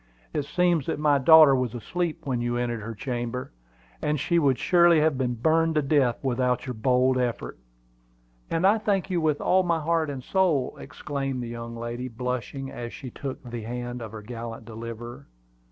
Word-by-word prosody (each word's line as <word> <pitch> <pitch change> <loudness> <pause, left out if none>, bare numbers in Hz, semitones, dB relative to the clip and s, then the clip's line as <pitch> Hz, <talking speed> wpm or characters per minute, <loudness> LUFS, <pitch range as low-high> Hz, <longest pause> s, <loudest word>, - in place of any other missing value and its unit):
"It 145 -2 -1
seems 175 -5 +1
that - - -1
my 145 -1 +3
daughter 155 0 +8
was 125 -3 -1
asleep 170 +8 -3
when 125 -3 -1
you 120 0 -1
entered 120 -2 -2
her 115 +2 -6
chamber, 120 +2 -4 0.5
and 150 -1 0
she 170 +4 +2
would 135 -5 +3
surely 170 -2 +5
have 155 -1 +2
been 125 -2 -1
burned 160 +6 +2
to 150 - +2
death 135 -4 +2
without 125 -1 0
your 125 - -4
bold 125 +3 +2
effort." 120 - -3 0.9
"And 165 +3 +1
I 210 +3 +5
thank 200 -3 0
you 175 -2 +1
with 155 -2 +1
all 190 - +3
my 170 -2 +1
heart 160 0 0
and 135 -3 -5
soul!" 170 -8 +1
exclaimed 135 -3 -4
the 120 - -6
young 115 0 -6
lady, 120 +2 -4
blushing 125 +3 -4
as 120 -1 -6
she 130 - -8
took 135 +1 -6
the 120 -2 -6
hand 120 +2 -5
of 110 -2 -7
her 110 -1 -8
gallant 115 0 -7
deliverer. 115 +3 -8
130 Hz, 185 wpm, -26 LUFS, 120-155 Hz, 0.9 s, daughter